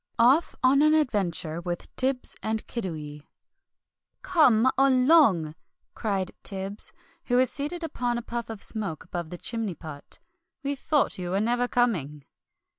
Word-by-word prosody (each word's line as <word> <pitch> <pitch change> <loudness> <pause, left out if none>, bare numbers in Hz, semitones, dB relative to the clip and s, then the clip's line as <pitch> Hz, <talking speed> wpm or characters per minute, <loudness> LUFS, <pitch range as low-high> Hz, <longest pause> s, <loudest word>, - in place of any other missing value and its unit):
OFF 260 +8 +4
ON 270 +2 +5
AN 305 +1 +5
ADVENTURE 185 - 0
WITH 175 0 -5
TIBBS 260 0 0
AND 220 0 -2
KIDDIWEE 155 -9 -6 1.0
"Come 260 -7 +4
along!" 260 - +4 0.4
cried 195 -4 -2
Tibbs, 195 +1 -4 0.3
who 245 - +2
was 255 -1 +3
seated 300 +6 -3
upon 245 -6 -1
a 240 - -4
puff 235 -1 -4
of 220 -2 -6
smoke 200 -8 -2
above 175 -4 -5
the 175 - -7
chimney 220 -2 -3
pot, 150 -3 -6 0.5
"we 280 0 -1
thought 285 -4 +1
you 180 -1 -4
were 190 +2 +1
never 240 +3 +1
coming." 165 - 0
225 Hz, 140 wpm, -27 LUFS, 180-260 Hz, 1.0 s, ON